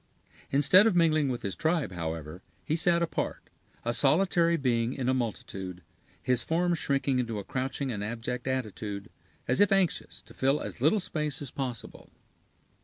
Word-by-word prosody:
Instead 165 +9 +6
of 210 - +2
mingling 155 -4 +3
with 125 -2 -3
his 100 - -3
tribe, 160 - 0
however, 80 -1 -5 0.2
he 155 - 0
sat 170 +1 +3
apart, 170 - -3 0.3
a 120 - 0
solitary 170 +4 +3
being 120 -3 +1
in 130 -2 -3
a 130 - +3
multitude, 95 -7 -4 0.4
his 125 -1 +1
form 175 +2 +1
shrinking 140 -4 0
into 115 -3 -2
a 100 - -4
crouching 135 +2 -3
and 105 -3 -3
abject 120 +4 -4
attitude, 110 -6 -4 0.4
as 125 - +1
if 205 -1 +5
anxious 195 -3 0
to - - -16
fill 135 +3 +1
as - - -7
little 160 +10 +4
space 150 -6 -3
as 140 -3 -6
possible. 125 -5 -6
130 Hz, 165 wpm, -29 LUFS, 115-160 Hz, 0.4 s, Instead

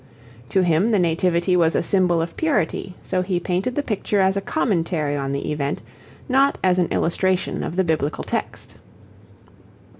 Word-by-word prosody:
To 190 - +2
him 175 +5 +2
the 220 - +3
Nativity 175 +1 +1
was 165 -2 +3
a - - +1
symbol 180 -4 +2
of 165 - -7
purity, 195 - -1
so 185 -1 -1
he 180 -1 -1
painted 185 +8 -2
the 290 - 0
picture 210 -3 -1
as 190 0 +3
a 200 - -1
commentary 170 - -1
on 135 -1 -2
the 140 +1 -3
event, 145 -1 -2 0.4
not 275 +1 +3
as 185 -1 +3
an 175 - +2
illustration 185 +2 0
of 165 - -4
the 190 - +2
Biblical 155 -3 -1
text. - - -4
180 Hz, 170 wpm, -22 LUFS, 165-195 Hz, 0.4 s, the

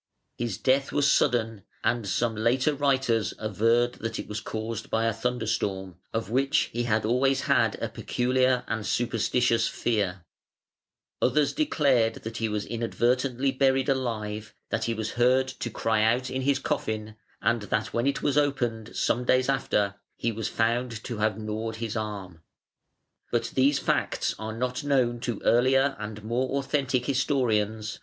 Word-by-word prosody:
His 115 -6 -3
death 135 +1 +2
was 145 0 +3
sudden, 115 -3 +1 0.2
and 120 -4 0
some 115 +2 0
later 125 +7 +2
writers 135 -7 +1
averred 115 +3 +1
that 115 0 -3
it - - -6
was 105 0 -4
caused 110 +1 -5
by 115 0 +1
a 115 - +2
thunderstorm, 110 -6 -2
of 115 -1 -3
which 135 +4 +2
he 120 +1 -1
had 110 -2 +1
always 135 +4 +2
had - - +2
a - - -1
peculiar 130 0 +1
and 110 -1 -2
superstitious 115 +2 +1
fear. 100 -6 -1 1.0
Others 140 +3 +2
declared 140 - +2
that 115 +1 -5
he 115 -1 -1
was 105 -1 -2
inadvertently 125 +3 0
buried 135 0 +2
alive, 110 -5 -2 0.2
that 115 0 0
he 115 - -1
was 110 -1 -3
heard 130 +2 +3
to 130 -2 -5
cry 110 0 0
out 120 +4 +2
in 130 - -2
his 135 +1 +2
coffin, 110 -4 -3 0.2
and 115 -1 +1
that 110 +1 -1
when 120 +3 +1
it 140 - -1
was 145 0 +3
opened 120 -6 -1
some 125 - +1
days 130 +1 +2
after, 105 -7 +1 0.2
he 115 - 0
was 110 0 -3
found 115 0 -1
to 120 -3 -5
have 105 -1 +1
gnawed 110 +1 -4
his 115 -1 -4
arm. 100 -6 -5
115 Hz, 135 wpm, -27 LUFS, 110-130 Hz, 1.0 s, was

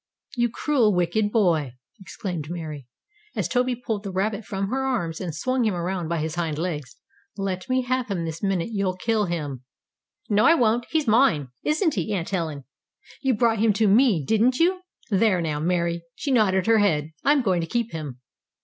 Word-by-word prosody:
"You 240 -1 +2
cruel, 235 -5 +2
wicked 180 +4 +1
boy!" 165 - +2 0.3
exclaimed 180 -5 -6
Mary, 155 -6 -6 0.5
as - - -1
Toby 250 0 +1
pulled 230 -4 -3
the 200 -2 -6
rabbit 200 +3 -1
from 195 -1 -3
her 265 +3 -1
arms, 195 -12 -2
and 170 -5 -4
swung 255 +9 0
him 215 -4 +1
around 175 0 -2
by 170 +1 -1
his 155 0 -2
hind 165 -4 -2
legs. 155 -6 -4 0.4
"Let 190 0 -3
me 255 0 +2
have 255 0 -1
him 175 -4 -2
this 160 0 -5
minute. 195 -2 0
You'll 195 -3 -1
kill 220 +1 +1
him!" 150 -7 -4 0.6
"No, 210 0 +3
I 330 - +7
won't! 235 -3 +2
He's 315 -2 +1
mine! 210 - +3
Isn't 315 +1 +1
he, 190 +1 -2
Aunt 170 -3 -3
Helen? 160 -7 -2 0.6
You 265 -3 +2
brought 225 -1 +2
him 220 -1 +4
to 215 +1 +2
me, 205 - +4
didn't 230 - +3
you? 365 +4 +2 0.3
There 195 -2 +3
now, 155 -3 -2
Mary, 170 +1 0
she 280 - -3
nodded 195 -6 +3
her 225 -1 +4
head! 160 -7 +1
I'm 285 -1 +3
going 185 -5 +1
to 165 - -4
keep 235 +1 -1
him." 145 -6 -6
195 Hz, 190 wpm, -24 LUFS, 170-235 Hz, 0.6 s, I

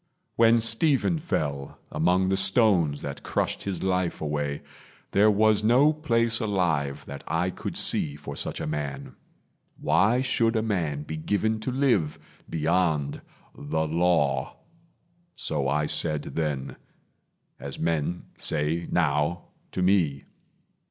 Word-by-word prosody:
When 115 0 +5
Stephen 135 +8 +2
fell, 70 - -3
Among 90 +5 +2
the 95 - +2
stones 95 - +2
that - - -5
crushed - - -2
his 95 -3 -3
life 90 -2 0
away, 75 -2 -3 0.5
There 105 +2 +5
was 105 0 +3
no 130 +7 +5
place 115 -6 +1
alive 85 - -1
that 70 0 -8
I 90 +3 0
could - - -5
see 70 -1 0
For 70 -1 -8
such - - -2
a - - -3
man. 75 -2 -4 0.7
Why 120 +6 +3
should 115 -3 +1
a 110 - +1
man 80 -9 -1
be 80 +1 -6
given 110 +6 0
To 130 - -3
live 125 - +1 0.3
beyond 80 -3 0 0.3
the 80 +2 -2
Law? 80 -4 +1 0.8
So 70 -3 -2
I 75 +2 +1
said 75 -1 0
then, 75 -5 -3 0.8
As - - -7
men 85 +1 -1 0.2
say 80 +3 -1
now 80 +1 0 0.2
to 90 - -1
me. 85 -8 +2
85 Hz, 130 wpm, -26 LUFS, 75-110 Hz, 0.8 s, When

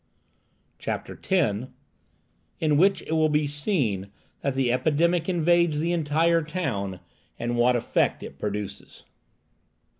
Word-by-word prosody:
CHAPTER - - -4
X. 130 - 0 0.9
IN 155 -2 +2
WHICH 195 +4 +3
IT - - -8
WILL 160 -1 +3
BE 150 0 +2
SEEN 140 - 0 0.3
THAT 140 -1 -1
THE 130 -2 +1
EPIDEMIC 160 +6 +1
INVADES 170 -2 +3
THE 170 +3 0
ENTIRE 165 +1 +2
TOWN, 125 - -3 0.4
AND 120 0 -2
WHAT 120 +1 +3
EFFECT 120 - 0
IT - - -10
PRODUCES. 105 -1 -5
150 Hz, 120 wpm, -25 LUFS, 120-170 Hz, 0.9 s, WHICH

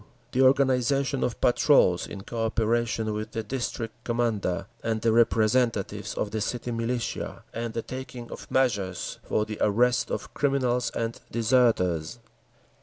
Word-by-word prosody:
The 130 - +2
organisation 135 0 +3
of 120 - -2
patrols, 120 - +4
in 100 - -7
co 115 +3 -4
operation 115 -1 0
with 110 +2 -5
the 115 -2 -2
District 115 -1 -3
Commander 115 -6 -1 0.2
and 110 -1 0
the 115 +1 +2
representatives 115 -1 +2
of 105 - -2
the 110 0 -2
city 120 +3 -3
militia, 115 +1 -3
and 115 0 -4
the 115 - -2
taking 130 -2 -7
of - - -9
measures 105 -9 0
for 105 - 0
the 105 -1 -6
arrest 120 +4 +3
of - - -4
criminals 130 -3 +1
and 115 0 -2
deserters. 115 -7 +2
115 Hz, 140 wpm, -27 LUFS, 110-125 Hz, 0.2 s, patrols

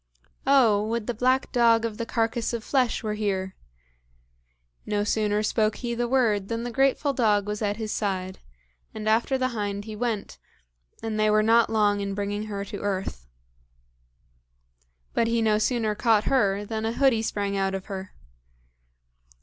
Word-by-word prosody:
"Oh! 230 -7 +5
would 230 -1 -2
the 245 - -2
black 255 +4 +1
dog 230 -2 +4
of 220 -2 -5
the 230 - -3
carcass 230 +1 -1
of 230 -2 -3
flesh 255 -3 0
were 215 -1 -2
here!" 195 -3 -2 1.3
No 205 -1 -1
sooner 210 0 0
spoke 215 0 +1
he 240 -2 -4
the 240 +1 -1
word 225 -6 +1
than 230 +1 -3
the 245 - -4
grateful 270 +3 +2
dog 210 -5 +2
was 210 +1 -4
at 205 -1 -1
his 220 -2 -4
side; 190 -3 -2 0.6
and 215 0 -5
after 230 +5 +2
the 255 0 0
hind 205 -3 -3
he 215 -1 -7
went, 225 -2 -3 0.6
and 220 -1 -2
they 215 0 +3
were 215 0 +4
not 230 +1 +4
long 210 -2 +2
in 200 -1 -3
bringing 205 +1 -3
her 200 -1 -4
to 205 0 -7
earth. 190 - -3 1.9
But 230 - +2
he 230 0 +1
no 215 -1 +2
sooner 220 -1 0
caught 215 0 +2
her 205 -6 +1
than 220 +1 -4
a 225 +1 -1
hoodie 260 -4 +3
sprang 200 -2 -2
out 195 0 0
of 190 - -6
her. 195 -1 -7
215 Hz, 170 wpm, -25 LUFS, 205-235 Hz, 1.9 s, Oh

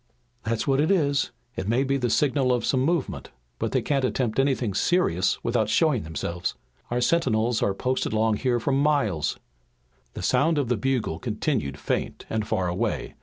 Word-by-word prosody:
"That's 115 0 -1
what 135 0 +2
it 155 - +1
is. 145 -7 +2 0.3
It 95 - -4
may 120 +5 +2
be 135 0 0
the 125 -3 0
signal 135 +1 +2
of 120 -2 +1
some 130 - +2
movement, 160 +3 -1 0.3
but - - -1
they - - +1
can't 140 -2 0
attempt 125 -2 0
anything 130 -6 +1
serious 95 - +2
without 115 -3 +1
showing 150 -1 +3
themselves. 85 +2 -4 0.3
Our 120 +1 0
sentinels 120 -6 +2
are 100 - +1
posted 130 +5 -1
along 110 0 +2
here 125 0 +1
for 130 - -1
miles." 135 - +1 0.8
The - - -5
sound 160 +2 +2
of 140 -5 0
the 125 - +3
bugle 115 -7 -1
continued 105 - -2
faint - - -3
and 110 -1 -1
far 90 - 0
away. 90 +1 -2
125 Hz, 175 wpm, -25 LUFS, 110-140 Hz, 0.8 s, showing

